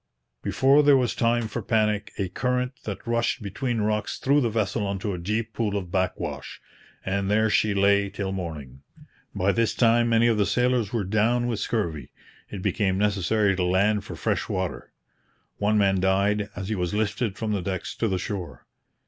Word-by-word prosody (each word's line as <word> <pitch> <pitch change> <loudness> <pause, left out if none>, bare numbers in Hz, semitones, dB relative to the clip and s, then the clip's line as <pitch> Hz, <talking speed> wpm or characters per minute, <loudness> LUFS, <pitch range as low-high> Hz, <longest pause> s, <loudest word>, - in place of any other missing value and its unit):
Before 135 +3 +4
there 145 -2 +6
was 125 -2 +1
time 115 -1 +1
for 110 - -4
panic, 105 -3 0
a 95 - -1
current 125 +6 -1
that 100 -3 -6
rushed 115 -1 0
between 115 +4 -2
rocks 105 0 -1
threw 140 +2 +2
the 120 - +1
vessel 105 -2 -1
into 100 +1 -3
a 90 - -5
deep 110 +5 -2
pool 105 -3 -1
of 90 -3 -6
backwash; 95 0 -3 0.5
and 95 +1 -1
there 110 +1 +2
she 105 -1 +2
lay 100 0 +3
till 100 0 -4
morning. 75 -8 -6 0.5
By 95 +2 +2
this 115 +1 0
time 120 0 +3
many 115 0 +4
of 115 -2 +2
the 100 - +2
sailors 125 -4 +1
were 115 -4 -1
down 110 +5 +1
with 115 -3 -1
scurvy. 85 - -2 0.4
It 95 -3 -7
became 100 -1 +1
necessary 105 0 +1
to 90 - -1
land 100 +3 +2
for - - -8
fresh - - -1
water. - - -3 0.7
One 105 +1 +2
man 95 -2 +3
died 100 +2 +1
as 95 0 -5
he - - 0
was 90 0 -2
lifted 105 0 -1
from 110 -1 -2
the 100 -2 0
decks 95 0 -4
to 115 - 0
the 95 -3 0
shore. 90 - -6
105 Hz, 185 wpm, -25 LUFS, 95-115 Hz, 0.7 s, there